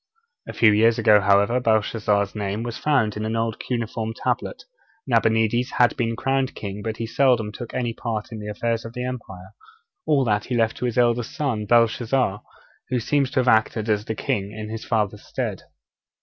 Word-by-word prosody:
A - - -6
few 110 -2 +5
years 110 +2 +4
ago, 105 -1 +5
however, 100 +5 +3
Belshazzar's 105 -3 +1
name 105 +1 -3
was 120 -1 -5
found 135 -8 +1
on 105 - -4
an 110 +1 -2
old 115 -1 -1
cuneiform 115 -2 -3
tablet. - - -3 0.4
Nabonides 115 0 +1
had 120 -2 +3
been 115 -1 -1
crowned 135 +2 -1
king, 100 0 -6
but 110 +1 -4
he 115 - -3
seldom 115 -3 +2
took 120 +2 -8
any 120 -2 -1
part 115 -2 -4
in 110 - -6
the 105 - -7
affairs 115 +2 -2
of 115 - -9
the 125 +1 -4
empire. 95 -7 -7 0.5
All 145 -4 +3
that 105 -2 0
he 125 - -2
left 115 -1 +1
to - - -3
his 120 -1 -2
eldest 120 -1 +1
son, 120 -8 -2
Belshazzar, 115 -1 +2 0.5
who 125 - 0
seems 140 +3 +1
to 130 -1 +1
have 125 - -3
acted 110 -1 +2
as 105 -1 +1
king 100 -2 -2
in 110 0 -7
his 115 0 -5
father's 105 -3 -1
stead. - - -4
115 Hz, 190 wpm, -23 LUFS, 105-120 Hz, 0.5 s, few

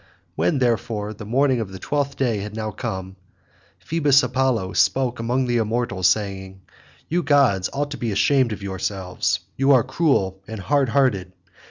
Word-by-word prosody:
When, 85 +8 +1
therefore, 115 -4 -1
the 105 0 -10
morning 130 +2 +2
of 105 -4 -4
the 95 - -7
twelfth 140 +7 -2
day 120 -6 0
had 105 +1 -6
now 110 -1 -3
come, 95 0 -5 0.6
Phoebus 145 -4 +2
Apollo 125 -6 0
spoke 120 +7 +1
among 125 +3 0
the 120 -1 0
immortals 110 -4 0
saying, 95 -2 -2 0.5
"You 175 +2 0
gods 135 - +3
ought 145 +1 -3
to 145 - -5
be 115 -2 -1
ashamed 130 +4 +2
of 105 -1 -6
yourselves; 95 -1 -2 0.2
you 135 +1 +3
are 125 -3 +5
cruel 130 - 0
and 110 -1 -6
hard 140 +5 +1
hearted. 115 -9 +1
115 Hz, 165 wpm, -22 LUFS, 95-135 Hz, 0.6 s, are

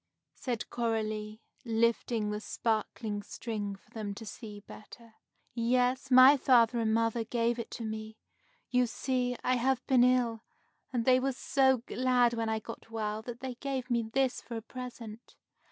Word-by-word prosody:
said 240 -4 -4
Coralie, 215 -2 -2 0.2
lifting 230 -2 +1
the 210 - -2
sparkling 215 -1 -2
string 205 -2 -5
for 195 - -24
them 210 -3 -5
to 225 - -9
see 210 -1 -9
better. 225 +2 -13 0.4
"Yes, 250 +3 +1
my 260 +2 +8
father 240 -3 +4
and 220 -1 +1
mother 230 +1 +1
gave 235 +1 0
it 235 - -5
to 235 - -6
me. 220 0 -5 0.5
You 250 0 +3
see, 250 +1 -1
I 255 0 +2
have 255 +1 0
been 255 -2 +5
ill, 245 -3 +2 0.5
and 240 -3 -1
they 255 0 +5
were 270 +1 0
so 265 -1 +2
glad 250 -1 +2
when 225 -1 -1
I 220 - 0
got 225 +1 -9
well 215 -1 -3
that 240 +1 -8
they 260 -1 -4
gave 260 0 -4
me 235 -1 +3
this 250 +3 0
for 235 - -6
a - - -5
present." 240 -2 -9
235 Hz, 165 wpm, -31 LUFS, 220-250 Hz, 0.5 s, my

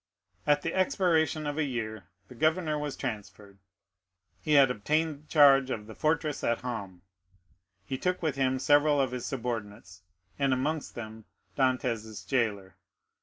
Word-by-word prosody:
At 145 0 +3
the 165 - -2
expiration 165 -4 +1
of 145 +1 -3
a - - +2
year 110 -8 -4 0.2
the - - -12
governor 155 +3 +1
was 150 -2 -4
transferred; 100 -3 -7 0.8
he 155 - -1
had 140 -3 +6
obtained 150 +6 -1
charge 135 -3 +6
of 105 -5 -4
the 110 - -10
fortress 155 +2 -1
at 115 - 0
Ham. 100 -8 -6 0.8
He 130 +4 -4
took 180 0 0
with 155 -4 0
him 130 -1 +1
several 145 +2 +4
of 135 -2 +1
his 125 -1 -4
subordinates, 105 -7 -5 0.4
and 140 -1 +2
amongst 145 +4 -2
them 110 -2 -8 0.3
Dantès' 120 -5 -1
jailer. 105 -7 -1
130 Hz, 145 wpm, -29 LUFS, 110-150 Hz, 0.8 s, had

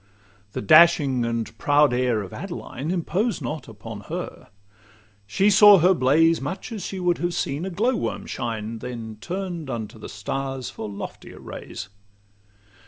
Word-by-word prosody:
The - - -4
dashing 135 -1 +6
and 115 -1 -3
proud 145 -2 +4
air 125 -4 +1
of 95 - -10
Adeline 165 -6 -6
Imposed 185 +6 0
not 150 -2 -5
upon 110 -1 -9
her: - - -6 0.8
she 195 - +3
saw 205 0 +9
her 180 +2 +5
blaze 165 +3 +3
Much 145 - -5
as 215 -4 -5
she 190 - -5
would 180 -1 +1
have 175 0 -1
seen 145 +6 -2
a - - -3
glow 225 +8 +1
worm - - -3
shine, 115 -2 -4
Then 115 -3 -7
turn'd 175 -5 -4
unto 110 -2 -5
the 105 - -8
stars 135 +4 -4
for 110 - -6
loftier 100 - -8
rays. 105 - -8
140 Hz, 155 wpm, -24 LUFS, 115-180 Hz, 0.8 s, saw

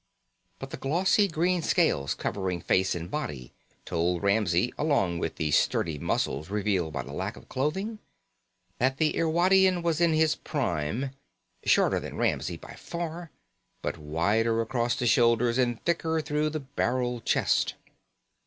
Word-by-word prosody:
But - - -8
the - - -5
glossy 185 +8 +2
green 175 +1 +1
scales 70 - +1
covering 95 -3 -2
face 95 +3 +1
and 85 +2 -6
body 70 - -5 0.3
told 85 +2 -1
Ramsey, 100 0 +2
along 100 - +1
with 80 - -3
the 75 -2 -1
sturdy 75 +1 +1
muscles 70 +3 -1
revealed 100 -5 0
by 70 -4 -3
the 65 +3 -9
lack 95 +6 -4
of - - -14
clothing, 190 - -2 0.8
that 130 +2 +1
the 155 +1 +1
Irwadian 180 +2 +3
was 170 -1 0
in 170 -2 +4
his 155 0 +3
prime, 120 - -2 0.5
shorter - - +3
than - - -7
Ramsey - - 0
by - - -11
far, 170 0 -6 0.5
but - - -3
wider 100 +10 +1
across 120 0 0
the 125 - -2
shoulders 115 +2 +3
and 120 -2 +1
thicker 160 -1 +1
through 150 0 0
the 155 0 -4
barrel 125 -3 -1
chest. - - +1
120 Hz, 145 wpm, -27 LUFS, -, 0.8 s, in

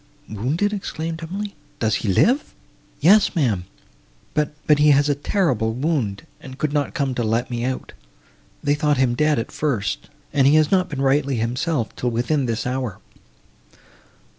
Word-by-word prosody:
"Wounded!" 145 - -1
exclaimed 165 -4 -4
Emily, 200 +5 -5 0.2
"does 110 -1 0
he - - -4
live?" 250 - +2 0.5
"Yes, 200 +3 +5
ma'am, 110 - +1 0.7
but—but 150 0 +1
he 150 0 +5
has 145 +1 +4
a - - +4
terrible 135 - 0
wound, 130 -8 -1
and 130 -1 -10
could 150 -1 -1
not 145 0 -1
come 140 -5 0
to 125 - -2
let 115 +3 0
me 120 -1 -2
out. 130 +1 -3 0.7
They 145 -1 +2
thought 145 -1 +1
him 130 -2 +2
dead, 150 +4 +2
at 115 - -3
first, 105 - -2 0.2
and 135 -2 +4
he 145 - +5
has 155 -1 +4
not 185 -2 +2
been 140 -3 -3
rightly 140 0 +2
himself, 120 +3 -1
till 125 - -1
within 125 +4 0
this 115 -1 -2
hour." 125 -5 -2
140 Hz, 165 wpm, -22 LUFS, 120-155 Hz, 0.7 s, Yes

